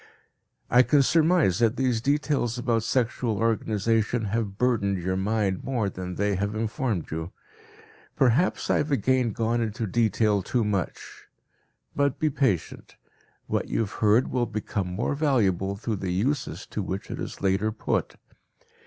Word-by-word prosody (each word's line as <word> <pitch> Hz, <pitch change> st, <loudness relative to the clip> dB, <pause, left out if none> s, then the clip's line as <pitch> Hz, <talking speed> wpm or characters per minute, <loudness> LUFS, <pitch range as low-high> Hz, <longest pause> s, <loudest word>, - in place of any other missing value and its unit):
I 125 Hz, -, +6 dB
can 140 Hz, +2 st, +4 dB
surmise 160 Hz, -, +3 dB
that 115 Hz, 0 st, +3 dB
these 125 Hz, -4 st, +1 dB
details 140 Hz, -3 st, 0 dB
about 120 Hz, -2 st, +1 dB
sexual 115 Hz, -1 st, 0 dB
organization 115 Hz, 0 st, 0 dB
have 105 Hz, -4 st, -2 dB
burdened 110 Hz, -6 st, +1 dB
your 95 Hz, +1 st, -2 dB
mind 100 Hz, -1 st, 0 dB
more 115 Hz, -7 st, -1 dB
than 90 Hz, 0 st, -6 dB
they 100 Hz, 0 st, 0 dB
have 100 Hz, +2 st, -2 dB
informed 110 Hz, -3 st, -2 dB
you. 80 Hz, +3 st, -4 dB, 0.8 s
Perhaps 135 Hz, +6 st, +2 dB
I -, -, +3 dB
have 150 Hz, -, -1 dB
again 130 Hz, -3 st, +2 dB
gone 115 Hz, +2 st, 0 dB
into 110 Hz, 0 st, -2 dB
detail 105 Hz, -1 st, +2 dB
too 120 Hz, +5 st, 0 dB
much. 100 Hz, -4 st, -4 dB, 0.7 s
But 140 Hz, -2 st, +1 dB
be 155 Hz, -1 st, +1 dB
patient; 130 Hz, -, -1 dB, 0.5 s
what -, -, -1 dB
you -, -, 0 dB
have 105 Hz, -, -3 dB
heard 110 Hz, +3 st, +2 dB
will 125 Hz, -2 st, 0 dB
become 100 Hz, -2 st, -3 dB
more 95 Hz, +10 st, -2 dB
valuable 105 Hz, -, +1 dB
through 110 Hz, +1 st, -3 dB
the 95 Hz, -1 st, -4 dB
uses 135 Hz, +10 st, -1 dB
to 105 Hz, -, -2 dB
which 95 Hz, +1 st, -5 dB
it -, -, -5 dB
is -, -, -6 dB
later 100 Hz, +3 st, +1 dB
put. 110 Hz, -, -2 dB
110 Hz, 155 wpm, -26 LUFS, 100-125 Hz, 0.8 s, I